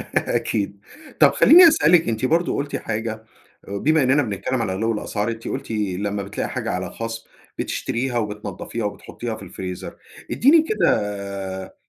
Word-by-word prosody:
أكيد. 100 -2 -1 0.4
طب - - +7
خلّيني 350 +2 +8
أسألِك 175 - +4
أنتِ 115 +2 -1
برضه 165 +6 +1
قُلتِ 145 +1 -3
حاجة 110 0 -4 0.4
بما 140 +10 +2
إنّنا 135 +3 +3
بنتكلّم 120 +3 -2
على 95 -5 -1
غِلِو 110 +4 0
الأسعار 105 0 -2
أنتِ 115 0 -6
قُلتِ 135 -2 -4
لمّا 100 -1 -2
بتلاقي 100 +1 -4
حاجة - - -3
عليها - - -3
خصم، 115 0 -6 0.3
بتشتريها 125 +1 -2
وبتنضّفيها 105 0 -4
وبتحطّيها 110 +2 -5
في 110 - -11
الفريزر. 90 0 -7 0.4
ادّيني 305 +6 +5
كده 100 - -2
110 Hz, 140 wpm, -22 LUFS, 100-130 Hz, 0.4 s, خلّيني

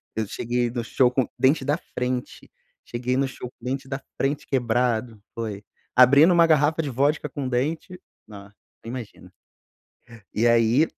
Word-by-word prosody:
eu 110 -1 -2
cheguei 120 +3 -1
no 120 0 -3
show 125 +2 +2
com 130 0 0
dente 135 +4 +3
da 145 +2 +1
frente, 125 -6 -5 0.3
cheguei 125 +1 -2
no 135 0 +1
show 125 -2 -8
com 125 - -19
dente 135 +1 -3
da 135 0 -5 0.2
frente 140 +2 -1
quebrado. 120 -3 0
Foi 105 -3 -5 0.3
abrindo 140 +7 +7
uma 170 -1 +6
garrafa 155 +1 +3
de 145 - -4
vodca 145 +3 0
com 140 -1 -5
o - - -2
dente, 155 +8 -2 0.3
nossa 100 -1 -12 0.3
nem 115 - -8
imagina. 120 -4 -9 1.0
E 115 +3 +1
aí 115 +5 +4
125 Hz, 165 wpm, -24 LUFS, 120-140 Hz, 1.0 s, abrindo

